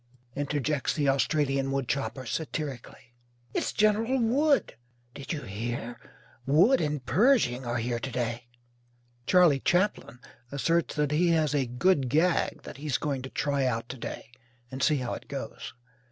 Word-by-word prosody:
interjects 145 0 -1
the 145 -3 0
Australian 135 0 +1
woodchopper, 135 0 -2
satirically. 135 -3 -5 0.4
"It's - - -1
General 215 +4 +2
Wood." 275 +6 +2 0.4
"Did 140 +1 -7
you 150 -3 -3
hear, 120 +3 -5 0.5
Wood 185 - +5
and 150 -4 -2
Pershing 140 - +3
are 120 +1 -1
here 120 0 -2
to 130 - -4
day?" 120 -1 -3 0.8
Charley 175 -7 +5
Chaplin 180 -4 0 0.3
asserts 165 +4 0
that 150 -1 0
he 165 +4 +3
has 160 -3 +2
"a 135 -3 +1
good 135 +2 +2
gag" 165 +6 +1
that - - -9
he's 145 -2 -1
going 140 -3 -2
to 130 - -7
try 140 -1 -1
out 115 -2 -1
to 130 - -6
day 115 -1 -7 0.4
and 130 +1 -6
see 150 0 +3
how 125 -2 -3
it - - -8
goes. - - -7
140 Hz, 150 wpm, -28 LUFS, 125-165 Hz, 0.8 s, Wood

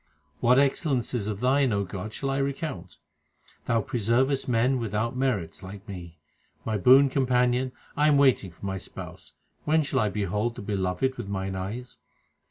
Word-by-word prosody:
What 125 +2 +4
excellences 135 -5 +1
of 105 0 -4
Thine, 130 0 +3
O 100 -1 0
God, 100 +3 -6
shall 135 +4 -3
I 135 - 0
recount? 135 - -4 0.7
Thou 115 -2 +1
preservest 125 +6 +1
men 125 +2 +2
without 115 +2 -2
merits 115 -12 -1
like 100 +3 -10
me. 85 -4 -8 0.5
My 110 - -1
boon 130 +8 +6
companion, 125 -1 +1 0.2
I 150 +1 +3
am 150 -2 +5
waiting 130 -8 +3
for 85 +3 -11
my 95 0 -2
Spouse; 85 - -10 0.3
when 155 +1 +3
shall 140 -2 0
I 105 - +2
behold 105 +3 -1
the - - -7
Beloved 100 +6 -1
with 115 - -5
mine 95 -1 -3
eyes 105 +7 -6
115 Hz, 165 wpm, -27 LUFS, 100-130 Hz, 0.7 s, boon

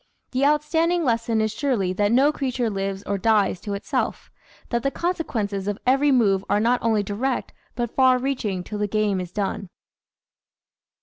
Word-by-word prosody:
The 260 +2 0
out 300 +1 +3
standing 330 +3 +1
lesson 230 -3 +1
is 220 -1 0
surely 215 -7 0
that 205 +2 +1
no 270 +5 +4
creature 255 -5 -1
lives 195 0 -3
or 200 -1 -2
dies 210 -4 +2
to 205 -1 -4
itself, 200 - -3 0.4
that 235 -1 0
the 275 - +1
consequences 225 - -2
of 205 -1 -1
every 270 +3 +3
move 200 -7 +3
are 205 - +3
not 240 +3 +2
only 220 -3 +1
direct 235 +6 -2 0.2
but 240 -1 -3
far 260 -1 +5
reaching 245 -8 -2
till 210 +3 -6
the 210 - 0
game 205 -2 0
is 180 -1 -7
done. 195 -1 -3
225 Hz, 175 wpm, -23 LUFS, 200-265 Hz, 0.4 s, far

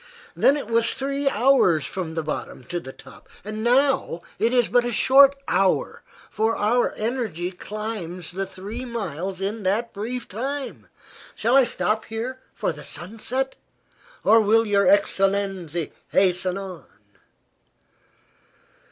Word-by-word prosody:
Then 280 - +4
it 290 - -5
was 230 +1 +1
three 275 +1 -1
hours 210 - +3
from 175 -4 -4
the 160 - -1
bottom 150 -3 -5
to 175 +8 -4
the 130 - -9
top. - - -16 0.2
Now 240 -1 +1 0.2
it 230 +2 +2
is 245 -2 +3
but 245 0 +3
a 240 - -2
short 275 +4 +6
hour, 190 +1 +1 0.3
for 220 +2 +1
our 235 +4 +2
energy 215 -7 -2
climbs 185 -3 -6
the 195 +2 -3
three 205 +6 -7
miles 195 - -4
in 210 +3 -2
that 210 +5 0
brief 235 +5 -4
time. 270 +7 -5 0.5
Shall 235 +4 +1
I 270 -2 +7
stop 220 -2 -1
here 235 +4 -5 0.2
for - - -1
the 150 -1 -10
sunset, 225 - -4 0.7
or 225 +1 +6
will 225 +2 +4
your 200 -1 +3
excellenzi 195 - +1 0.2
hasten 185 0 +2
on?" 190 -4 -8
215 Hz, 135 wpm, -24 LUFS, 185-245 Hz, 0.7 s, I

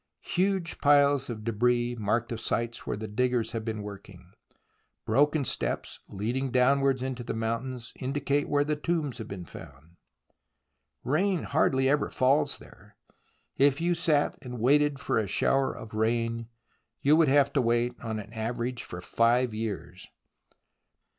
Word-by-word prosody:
Huge 185 -2 0
piles 145 -2 +4
of 110 -3 -5
debris 120 +2 +1
mark 115 +1 -1
the 115 - -3
sites 115 0 -2
where - - -2
the 110 +1 -5
diggers 120 +1 0
have 115 -1 -4
been 110 -2 -4
working; 95 -3 -11 0.7
broken 145 +5 +2
steps - - -2
leading 120 +7 -2
down 130 +3 +3
wards 135 -2 +1
into 130 -2 -4
the - - -4
mountains 115 +2 -3
indicate 140 +2 -1
where 145 0 +3
tombs 150 -1 -1
have 110 - -6
been 95 -3 -7
found. 80 +3 -13 1.1
Rain 175 +6 +1
hardly 135 -3 +2
ever 145 +2 +2
falls 135 +3 +2
there.... - - -17 0.6
If 140 0 +4
you 175 +1 +1
sat 160 -3 +1
and 125 -3 -7
waited 145 +4 +3
for 140 - 0
a 105 - -1
shower 135 +8 +2
of 110 - -10
rain, 115 +1 0 0.6
you 145 +2 +5
would 160 -1 +4
have 140 0 +3
to 140 - +3
wait 120 +1 +1
on 110 -1 -3
an 105 +1 -8
average 120 +2 -3
for 85 - -7
five 120 +4 +2
years 110 -2 -5
125 Hz, 150 wpm, -28 LUFS, 115-140 Hz, 1.1 s, you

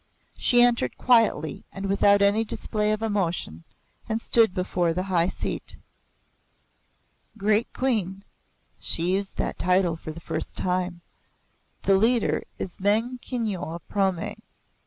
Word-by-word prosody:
She 245 -1 +4
entered 235 - +1
quietly 225 - +2
and 195 0 -6
without 200 +1 +4
any 205 +3 +3
display 210 -1 -1
of 215 +1 -1
emotion 175 - -2 0.4
and 220 0 0
stood 225 -2 +4
before 180 -2 -1
the 185 - -1
high 180 -3 +1
seat. - - -5 1.6
"Great 210 +3 +1
Queen" 200 -7 -1 0.6
she 170 +2 +2
used 195 +1 -2
that - - -2
title 180 -2 +2
for 160 -1 -8
the 160 - -9
first - - -5
time 180 -1 -1 0.8
"the 195 -1 +4
leader 230 +3 +2 0.2
is 180 - -6
Meng 225 +6 +1
Kyinyo 215 -10 -3
of 170 - -11
Prome. 190 -4 -1
195 Hz, 130 wpm, -25 LUFS, 180-220 Hz, 1.6 s, She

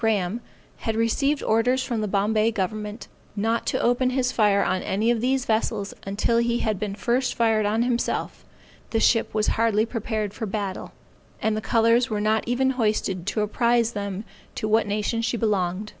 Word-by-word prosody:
Graham 220 -1 0 0.4
had 225 - -3
received 275 +6 +1
orders 245 +4 +2
from 235 -5 -2
the 210 - -1
Bombay 215 +2 +2
government, 210 +2 -4 0.3
not 225 +3 -1
to - - 0
open 245 +2 +2
his 255 -1 0
fire 205 -4 +3
on 185 - 0
any 215 +5 +1
of 230 -2 0
these 260 +1 +1
vessels 220 -2 -1
until 215 +4 +1
he 235 0 +1
had 215 -5 -1
been 205 -2 -3
first 245 +5 0
fired 220 -2 +2
on 220 +3 +1
himself, 245 -1 -2 0.5
the 225 - 0
ship 225 0 +3
was 215 -1 +2 0.2
hardly 220 -1 +3
prepared 220 -3 -3
for 220 - -4
battle, 200 -2 -4 0.5
and 220 0 0
the 215 - -2
colors 230 +4 +3
were 215 -2 -1
not 215 +2 +1
even 260 +2 +2
hoisted 200 -4 0
to 215 - 0
apprise 235 +2 +2
them 200 -2 -4 0.3
to 215 - -2
what 220 0 +2
nation 210 +3 -1
she 235 +1 -1
belonged. 205 -2 -1
220 Hz, 180 wpm, -24 LUFS, 210-235 Hz, 0.5 s, fire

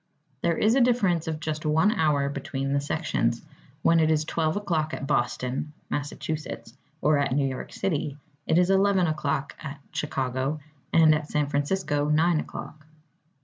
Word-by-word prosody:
There 170 - +1
is 215 +2 +3
a 270 - +4
difference 200 -10 +2
of 160 -1 -2
just 155 0 -3
one 160 +7 +3
hour 150 -8 +2
between 140 -1 -3
the 140 - +2
sections. 140 -6 0 0.4
When 165 0 +5
it 155 -1 +3
is 155 -1 +2
12 160 +2 0
o'clock 160 -6 -1
at - - -5
Boston, 130 +2 -1 0.2
Mass., 145 0 -2 0.9
or 150 -1 +4
at 140 - 0
New 140 0 +2
York 130 -1 -5
City, 150 -6 -2 0.3
it 160 - +3
is 180 +1 +4
11 195 -1 +4
o'clock 150 -3 -1
at 140 -1 -7
Chicago, 135 +1 -2 0.3
and 160 -1 +6
at 150 -1 -1
San 150 -1 +1
Francisco 145 +1 0
9 160 +2 +3
o'clock. 155 0 -8
155 Hz, 160 wpm, -26 LUFS, 140-165 Hz, 0.9 s, and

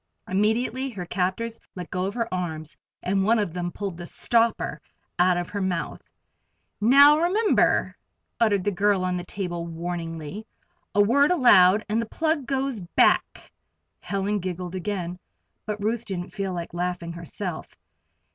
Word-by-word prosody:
Immediately 230 +7 0
her 195 -7 -6
captors 190 +6 -2 0.2
let 180 -2 -7
go 185 -1 -1
of 200 - -5
her 230 -2 -1
arms 160 -4 -3 0.3
and 195 +1 +1
one 225 +4 +3
of 205 -6 -1
them 175 -1 -3
pulled 195 -3 -5
the 175 0 -7
"stopper" 230 +4 +1 0.4
out 180 0 +4
of 175 -1 -3
her 205 - -3
mouth. 185 -3 -3 0.7
"Now, 280 +7 +7
remember!" 400 +6 +2 0.4
uttered 205 -5 +3
the 205 - +1
girl 195 0 +2
on 180 0 0
the 175 - -3
table, 175 -2 -4
warningly. 165 +3 -5 0.5
"A 205 - +6
word 280 +7 +4
aloud 215 - +6
and 220 +2 0
the 230 - -5
plug 315 0 -1
goes 270 -3 -1
back." 175 -2 +1 0.5
Helen 200 +1 -1
giggled 180 -1 -5
again, 185 -2 -4 0.5
but 210 0 -3
Ruth 220 +3 -1
didn't 185 -4 -5
feel 195 -2 -3
like 170 -2 -5
laughing 175 -1 -3
herself. 170 +1 -6
195 Hz, 150 wpm, -25 LUFS, 175-225 Hz, 0.7 s, Now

